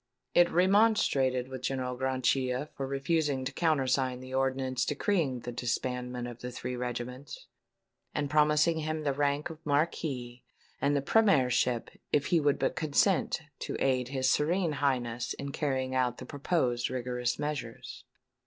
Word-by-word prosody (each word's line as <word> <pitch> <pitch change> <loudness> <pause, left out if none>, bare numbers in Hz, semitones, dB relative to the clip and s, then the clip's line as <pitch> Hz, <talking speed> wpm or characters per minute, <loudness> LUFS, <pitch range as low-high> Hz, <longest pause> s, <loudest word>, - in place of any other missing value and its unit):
It 175 0 +6
remonstrated 180 - +3
with 130 -1 -7
General 130 -1 -2
Grachia 130 +1 0
for 135 -2 -4
refusing 140 0 0
to 130 - -2
countersign 135 -5 +1
the 130 0 -9
ordinance 130 -1 0
decreeing 145 -4 0
the 120 - -5
disbandment 125 0 -3
of 120 -1 -9
the 125 - -5
three 125 +1 -4
regiments, 125 +2 -5 0.7
and 145 -1 -1
promising 150 +2 +3
him 155 0 -3
the 140 -2 +1
rank 145 +3 0
of 160 0 -12
Marquis 140 -5 -1 0.4
and 145 +1 +2
the 140 - 0
Premiership 130 - +3 0.2
if 145 -1 +2
he 170 - +6
would 145 -2 +2
but - - 0
consent 160 +2 +1 0.2
to - - -4
aid 130 -2 +1
his 130 0 -1
Serene 165 +5 +2
Highness 125 -4 -1
in 140 0 -5
carrying 130 -3 -1
out 125 -2 +1
the - - -8
proposed 135 -5 0
rigorous 125 -1 -2
measures. 150 -2 -5
135 Hz, 145 wpm, -30 LUFS, 125-150 Hz, 0.7 s, It